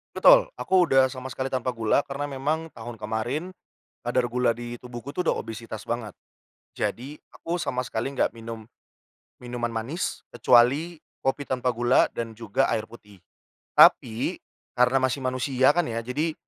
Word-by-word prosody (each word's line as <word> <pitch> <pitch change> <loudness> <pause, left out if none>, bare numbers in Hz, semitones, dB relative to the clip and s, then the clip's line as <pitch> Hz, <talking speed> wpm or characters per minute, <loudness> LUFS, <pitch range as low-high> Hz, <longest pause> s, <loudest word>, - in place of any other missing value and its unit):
Betul. - - +6
Aku 185 -1 +3
udah 135 -5 +4
sama 130 0 -7
sekali 130 +3 -3
tanpa 130 -1 -1
gula, 115 +4 +1
karena 140 +1 -4
memang 150 +4 -2
tahun 115 -1 -8
kemarin 120 +12 -3 0.5
kadar 125 +1 +2
gula 125 -1 +2
di 120 0 -7
tubuhku 125 +2 -8
udah 180 +3 0
obesitas 110 -1 -6
banget. 115 -4 -4 0.6
Jadi, 135 +5 -4
aku 170 +1 -4
sama 130 -6 -2
sekali 110 +4 -3
nggak - - +1
minum 115 -1 -8 0.7
minuman 120 -1 -4
manis, 115 - -4
kecuali 140 +8 +4 0.2
kopi 135 +1 -1
tanpa 125 -1 0
gula 120 +1 +3
dan 115 -1 -5
juga 115 +4 0
air 110 0 -4
putih. 105 -5 -16 0.5
Tapi 115 +1 +5 0.4
karena 125 +2 +4
masih 130 +1 0
manusia 130 +2 +2
kan 175 - +3
ya, 115 - -2
jadi 150 +6 -1
125 Hz, 150 wpm, -25 LUFS, 115-140 Hz, 0.7 s, Betul